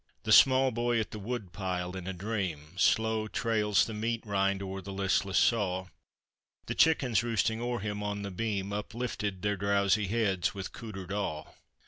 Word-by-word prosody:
The 110 Hz, -, -1 dB
small 130 Hz, +3 st, +7 dB
boy 120 Hz, 0 st, +1 dB
at 110 Hz, -, -3 dB
the 105 Hz, -, -6 dB
woodpile, 95 Hz, -5 st, -4 dB
in 95 Hz, -1 st, -6 dB
a 95 Hz, -, -2 dB
dream 90 Hz, -6 st, -4 dB
Slow 110 Hz, +2 st, +2 dB
trails 105 Hz, -3 st, +2 dB
the 110 Hz, -, -6 dB
meat 115 Hz, +2 st, -2 dB
rind 100 Hz, -1 st, 0 dB
o'er 95 Hz, 0 st, -5 dB
the 100 Hz, +2 st, -8 dB
listless 95 Hz, -1 st, 0 dB
saw; 95 Hz, -5 st, +2 dB, 0.8 s
The -, -, -3 dB
chickens 130 Hz, -9 st, +3 dB
roosting 115 Hz, -1 st, 0 dB
o'er 120 Hz, 0 st, -1 dB
him 105 Hz, 0 st, -3 dB
on 105 Hz, 0 st, -3 dB
the 100 Hz, -, -5 dB
beam 100 Hz, 0 st, -2 dB
Uplifted 105 Hz, -2 st, -4 dB
their 105 Hz, -1 st, 0 dB
drowsy 100 Hz, +1 st, +2 dB
heads 100 Hz, -2 st, 0 dB
with 95 Hz, -2 st, -6 dB
cootered 95 Hz, -5 st, -8 dB
awe. 100 Hz, -7 st, -2 dB
105 Hz, 165 wpm, -30 LUFS, 95-115 Hz, 0.8 s, small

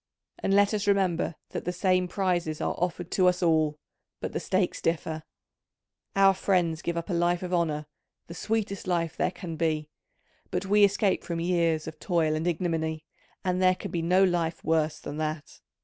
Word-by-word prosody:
And 195 Hz, -, +1 dB
let 205 Hz, +1 st, +4 dB
us 205 Hz, -1 st, -1 dB
remember 185 Hz, -5 st, +1 dB
that -, -, -5 dB
the 180 Hz, -, 0 dB
same 185 Hz, 0 st, +1 dB
prizes 175 Hz, -4 st, -1 dB
are -, -, -1 dB
offered 175 Hz, 0 st, -2 dB
to 185 Hz, -1 st, +3 dB
us 180 Hz, 0 st, +2 dB
all, 155 Hz, -3 st, +2 dB, 0.4 s
but -, -, -5 dB
the -, -, -1 dB
stakes 185 Hz, -1 st, 0 dB
differ: 160 Hz, -1 st, -1 dB, 0.9 s
our 195 Hz, 0 st, +6 dB
friends 175 Hz, -4 st, +1 dB
give 170 Hz, 0 st, -2 dB
up 170 Hz, +3 st, -3 dB
a -, -, 0 dB
life 175 Hz, +1 st, +1 dB
of 180 Hz, 0 st, -4 dB
honour, 155 Hz, -3 st, 0 dB, 0.4 s
the 170 Hz, -, -9 dB
sweetest 200 Hz, +1 st, -2 dB
life 170 Hz, -2 st, 0 dB
there -, -, +1 dB
can 175 Hz, -3 st, -7 dB
be, 155 Hz, -2 st, 0 dB, 0.6 s
but 180 Hz, +2 st, -2 dB
we 205 Hz, +2 st, +4 dB
escape 200 Hz, -1 st, +3 dB
from 170 Hz, -1 st, -3 dB
years 170 Hz, -2 st, +1 dB
of 160 Hz, -1 st, -8 dB
toil 165 Hz, -4 st, +1 dB
and 155 Hz, +2 st, -1 dB
ignominy, 160 Hz, -2 st, -1 dB, 0.4 s
and 185 Hz, 0 st, +1 dB
there 185 Hz, 0 st, +5 dB
can -, -, -7 dB
be 170 Hz, -, -1 dB
no 180 Hz, +3 st, +4 dB
life 175 Hz, -3 st, 0 dB
worse 155 Hz, -1 st, +1 dB
than 145 Hz, -, -7 dB
that. 155 Hz, -1 st, -4 dB
175 Hz, 185 wpm, -27 LUFS, 160-185 Hz, 0.9 s, our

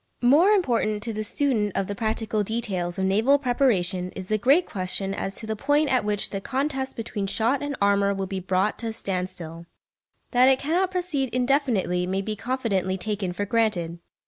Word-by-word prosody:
More 295 Hz, +10 st, +6 dB
important 235 Hz, -, +1 dB
to 225 Hz, 0 st, -3 dB
the 215 Hz, 0 st, -3 dB
student 215 Hz, -4 st, 0 dB
of 195 Hz, -, +1 dB
the 205 Hz, -, -4 dB
practical 220 Hz, 0 st, -1 dB
details 200 Hz, -5 st, -2 dB
of 190 Hz, -, 0 dB
naval 220 Hz, +9 st, +4 dB
preparation 215 Hz, -9 st, +1 dB
is 190 Hz, -, -6 dB
the 215 Hz, +3 st, 0 dB
great 280 Hz, -, +4 dB
question 195 Hz, 0 st, -1 dB
as 195 Hz, 0 st, -4 dB
to 225 Hz, -, -6 dB
the 220 Hz, 0 st, -2 dB
point 290 Hz, +5 st, +2 dB
at 255 Hz, -, +2 dB
which 205 Hz, -1 st, -1 dB
the 195 Hz, -, -3 dB
contest 270 Hz, +2 st, -2 dB
between 215 Hz, -3 st, -4 dB
shot 230 Hz, +7 st, +1 dB
and 290 Hz, -1 st, -3 dB
armour 200 Hz, 0 st, +3 dB
will 195 Hz, -1 st, -2 dB
be 190 Hz, 0 st, -4 dB
brought 185 Hz, +3 st, 0 dB
to 230 Hz, -, -4 dB
a 225 Hz, -, -3 dB
standstill. 180 Hz, -5 st, -5 dB, 0.6 s
That 250 Hz, +1 st, +5 dB
it 265 Hz, -, +4 dB
cannot 340 Hz, +7 st, 0 dB
proceed 350 Hz, -8 st, -1 dB
indefinitely 245 Hz, -9 st, +1 dB
may 190 Hz, +1 st, -1 dB
be 215 Hz, +1 st, -3 dB
confidently 210 Hz, -6 st, -1 dB
taken 200 Hz, -1 st, -2 dB
for 205 Hz, +3 st, -3 dB
granted. 190 Hz, -7 st, 0 dB
215 Hz, 190 wpm, -25 LUFS, 190-260 Hz, 0.6 s, More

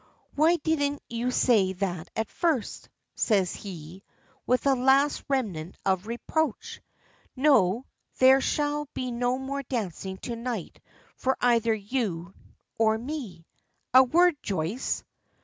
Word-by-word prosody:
"Why 315 Hz, +4 st, +4 dB
didn't 290 Hz, -3 st, -1 dB
you 235 Hz, +1 st, -2 dB
say 215 Hz, -7 st, +3 dB
that 180 Hz, -3 st, -3 dB
at 220 Hz, -1 st, -2 dB
first?" 315 Hz, -, -1 dB, 0.2 s
says 195 Hz, -5 st, +1 dB
he, 180 Hz, -2 st, -9 dB, 0.5 s
with 250 Hz, +2 st, +2 dB
a 275 Hz, -, +5 dB
last 270 Hz, +3 st, +3 dB
remnant 190 Hz, -, -2 dB
of 190 Hz, +1 st, 0 dB
reproach. 250 Hz, +4 st, -2 dB, 0.5 s
"No; 255 Hz, -5 st, +3 dB, 0.3 s
there 265 Hz, +1 st, +6 dB
shall 295 Hz, +1 st, -1 dB
be 255 Hz, -1 st, -3 dB
no 245 Hz, +1 st, 0 dB
more 270 Hz, +1 st, -4 dB
dancing 195 Hz, -, -4 dB
to 235 Hz, -, -3 dB
night 230 Hz, -5 st, -5 dB, 0.4 s
for 265 Hz, +1 st, 0 dB
either 230 Hz, -2 st, +3 dB
you 200 Hz, -6 st, -3 dB, 0.5 s
or 220 Hz, -1 st, +3 dB
me. 230 Hz, -, -6 dB, 0.5 s
A 260 Hz, -, +10 dB
word, 335 Hz, +6 st, +4 dB
Joyce!" 190 Hz, +5 st, -2 dB
240 Hz, 125 wpm, -27 LUFS, 195-270 Hz, 0.5 s, A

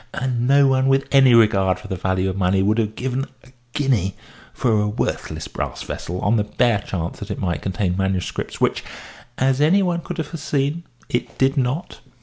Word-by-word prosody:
And 125 Hz, -2 st, -1 dB
no 140 Hz, +1 st, +5 dB
one 130 Hz, 0 st, +3 dB
with 135 Hz, 0 st, +3 dB
any 135 Hz, -3 st, +6 dB
regard 100 Hz, -5 st, +4 dB
for 95 Hz, -, -11 dB
the 95 Hz, -, -3 dB
value 95 Hz, +1 st, 0 dB
of 95 Hz, -, -2 dB
money 95 Hz, 0 st, +2 dB
would 105 Hz, +3 st, +2 dB
have 110 Hz, -1 st, -1 dB
given 130 Hz, +1 st, -2 dB, 0.2 s
a 130 Hz, -, -18 dB, 0.2 s
guinea 120 Hz, -, +1 dB, 0.4 s
for 110 Hz, -4 st, +1 dB
a 105 Hz, -, 0 dB
worthless 105 Hz, -, -3 dB
brass -, -, -5 dB
vessel 90 Hz, +2 st, -5 dB
on 110 Hz, +3 st, +2 dB
the 105 Hz, -, +2 dB
bare 110 Hz, +1 st, +1 dB
chance 85 Hz, -5 st, -5 dB
that -, -, -7 dB
it -, -, -3 dB
might 85 Hz, -2 st, -2 dB
contain 95 Hz, -1 st, -1 dB
manuscripts, 95 Hz, -1 st, -2 dB
which -, -, +1 dB, 0.5 s
(as 130 Hz, +1 st, +2 dB
any 185 Hz, +7 st, +4 dB
one 175 Hz, -2 st, 0 dB
could -, -, -6 dB
have 160 Hz, -, -2 dB
foreseen) 150 Hz, 0 st, -2 dB, 0.2 s
it 120 Hz, -, -3 dB
did 135 Hz, +1 st, +2 dB
not." 135 Hz, +5 st, -2 dB
120 Hz, 195 wpm, -21 LUFS, 95-135 Hz, 0.5 s, any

